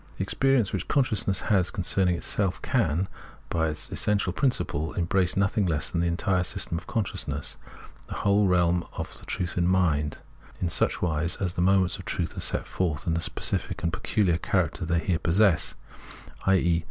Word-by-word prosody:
The -, -, -1 dB
experience 135 Hz, -7 st, +1 dB
which 95 Hz, -, -2 dB
consciousness 110 Hz, -8 st, +1 dB
has 95 Hz, -4 st, +2 dB
concerning 90 Hz, 0 st, +1 dB
itself 95 Hz, +2 st, -1 dB
can, 95 Hz, -, +1 dB, 0.4 s
by 80 Hz, -1 st, +1 dB
its 75 Hz, -1 st, -4 dB
essential 100 Hz, -3 st, 0 dB
principle, 80 Hz, -, -1 dB
embrace 90 Hz, +1 st, +1 dB
nothing 100 Hz, 0 st, +2 dB
less 80 Hz, -3 st, -1 dB
than 85 Hz, -, 0 dB
the 85 Hz, -, +1 dB
entire 90 Hz, +2 st, +1 dB
system 85 Hz, -, -3 dB
of -, -, -17 dB
consciousness, 110 Hz, -4 st, -3 dB, 0.5 s
the -, -, -6 dB
whole 100 Hz, 0 st, +3 dB
realm 90 Hz, -1 st, +3 dB
of -, -, -6 dB
the -, -, -14 dB
truth 90 Hz, 0 st, -3 dB
of 90 Hz, -, +2 dB
mind, 80 Hz, -5 st, +1 dB, 0.4 s
and -, -, -7 dB
in 85 Hz, -, +1 dB
such -, -, +1 dB
wise 85 Hz, 0 st, 0 dB
that 95 Hz, -, -1 dB
the 90 Hz, -, -1 dB
Introduction 90 Hz, -, +4 dB
89 95 Hz, -1 st, +5 dB
aaoments 90 Hz, -, -2 dB
of -, -, -9 dB
truth -, -, -3 dB
are -, -, -5 dB
set -, -, +1 dB
forth 80 Hz, -6 st, -2 dB
in 85 Hz, -, +1 dB
the 85 Hz, -, 0 dB
specific -, -, -2 dB
and 85 Hz, -1 st, 0 dB
pecuhar 90 Hz, -1 st, +1 dB
character 90 Hz, -1 st, 0 dB
they 85 Hz, +1 st, +1 dB
here 85 Hz, -1 st, 0 dB
possess 90 Hz, +2 st, +3 dB, 0.3 s
— -, -, -17 dB
i.e. 85 Hz, -3 st, +3 dB
90 Hz, 190 wpm, -27 LUFS, 85-100 Hz, 0.5 s, 89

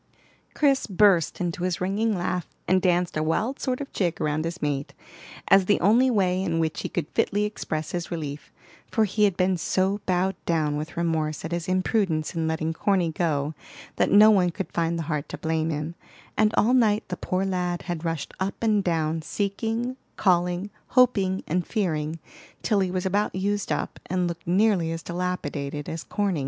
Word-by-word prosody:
Chris 275 Hz, -3 st, +2 dB
burst 190 Hz, -4 st, +3 dB
into 175 Hz, -1 st, -2 dB
his 180 Hz, -1 st, -1 dB
ringing 200 Hz, +3 st, 0 dB
laugh, 180 Hz, 0 st, -2 dB, 0.2 s
and 185 Hz, 0 st, +3 dB
danced 180 Hz, -1 st, +1 dB
a 155 Hz, -, 0 dB
wild 215 Hz, -, 0 dB
sort 255 Hz, -2 st, -1 dB
of 285 Hz, -, -7 dB
jig 175 Hz, -4 st, -1 dB
round 150 Hz, +1 st, 0 dB
his 170 Hz, +2 st, -4 dB
mate, 145 Hz, -1 st, -2 dB, 0.5 s
as 195 Hz, -1 st, +6 dB
the 205 Hz, -, +3 dB
only 230 Hz, +8 st, +4 dB
way 185 Hz, -5 st, +2 dB
in 170 Hz, -4 st, -1 dB
which 160 Hz, -1 st, -1 dB
he -, -, -4 dB
could 165 Hz, -4 st, -2 dB
fitly 205 Hz, +1 st, +1 dB
express 160 Hz, -7 st, -3 dB
his 175 Hz, -1 st, -3 dB
relief; 150 Hz, -4 st, -5 dB, 0.4 s
for 220 Hz, -2 st, +2 dB
he 210 Hz, +1 st, +2 dB
had 195 Hz, -4 st, 0 dB
been 185 Hz, 0 st, +2 dB
so 190 Hz, +4 st, 0 dB
bowed 185 Hz, +1 st, +2 dB
down 155 Hz, -3 st, +1 dB
with 155 Hz, +3 st, -5 dB
remorse 160 Hz, -3 st, -1 dB
at 165 Hz, -, -5 dB
his 170 Hz, -1 st, -2 dB
imprudence 185 Hz, -4 st, 0 dB
in 165 Hz, -2 st, -1 dB
letting 160 Hz, 0 st, -1 dB
Corny 180 Hz, -1 st, +1 dB
go 155 Hz, -3 st, -1 dB, 0.4 s
that -, -, +3 dB
no 210 Hz, +2 st, +8 dB
one 185 Hz, -4 st, +4 dB
could 190 Hz, +3 st, -5 dB
find 170 Hz, 0 st, 0 dB
the 165 Hz, -, -2 dB
heart 150 Hz, -2 st, -3 dB
to -, -, -5 dB
blame 160 Hz, 0 st, -1 dB
him, 150 Hz, +1 st, -3 dB, 0.4 s
and 215 Hz, -1 st, +3 dB
all 235 Hz, +4 st, +4 dB
night 220 Hz, -4 st, +3 dB
the 180 Hz, -, -2 dB
poor 185 Hz, +1 st, -1 dB
lad 180 Hz, -2 st, -1 dB
had 175 Hz, -3 st, -4 dB
rushed 165 Hz, -3 st, -3 dB
up 190 Hz, +1 st, -1 dB
and 215 Hz, -3 st, +2 dB
down 160 Hz, -2 st, 0 dB
seeking, 225 Hz, +8 st, -2 dB, 0.2 s
calling, 180 Hz, +1 st, +1 dB, 0.2 s
hoping, 200 Hz, -7 st, +3 dB
and 175 Hz, +2 st, -1 dB
fearing, 160 Hz, -7 st, -1 dB, 0.5 s
till 210 Hz, -3 st, +2 dB
he 190 Hz, -1 st, +1 dB
was 185 Hz, 0 st, -2 dB
about 200 Hz, +2 st, 0 dB
used 200 Hz, +1 st, -1 dB
up, -, -, -2 dB
and 180 Hz, -1 st, 0 dB
looked 170 Hz, -1 st, -6 dB
nearly 185 Hz, -2 st, +3 dB
as 165 Hz, 0 st, -5 dB
dilapidated 150 Hz, -5 st, -3 dB
as 160 Hz, 0 st, -4 dB
Corny. 200 Hz, -6 st, -1 dB
180 Hz, 190 wpm, -25 LUFS, 165-200 Hz, 0.5 s, no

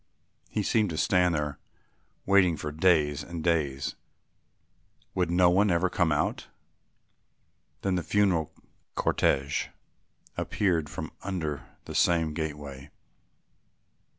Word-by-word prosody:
He 105 Hz, -, -1 dB
seemed 110 Hz, 0 st, +2 dB
to 80 Hz, -, -4 dB
stand 90 Hz, -1 st, +3 dB
there 75 Hz, -1 st, -3 dB, 0.7 s
waiting 95 Hz, -4 st, +4 dB
for 75 Hz, -, -4 dB
days 75 Hz, -3 st, +2 dB
and 85 Hz, -3 st, -6 dB
days. 75 Hz, -5 st, 0 dB, 1.2 s
"Would 90 Hz, -2 st, 0 dB
no 90 Hz, 0 st, +4 dB
one 100 Hz, +3 st, +4 dB
ever 90 Hz, +1 st, +2 dB
come 85 Hz, -3 st, +2 dB
out?" 75 Hz, -, -1 dB, 1.4 s
Then 95 Hz, -, +1 dB
the 90 Hz, -, +1 dB
funeral 90 Hz, -4 st, +1 dB, 0.5 s
cortège 70 Hz, +2 st, +1 dB, 0.7 s
appeared 85 Hz, -7 st, 0 dB
from 80 Hz, 0 st, -6 dB
under 80 Hz, -9 st, -4 dB, 0.2 s
the -, -, -7 dB
same 80 Hz, -3 st, +2 dB
gateway. 75 Hz, -3 st, -5 dB
85 Hz, 110 wpm, -28 LUFS, 75-90 Hz, 1.4 s, waiting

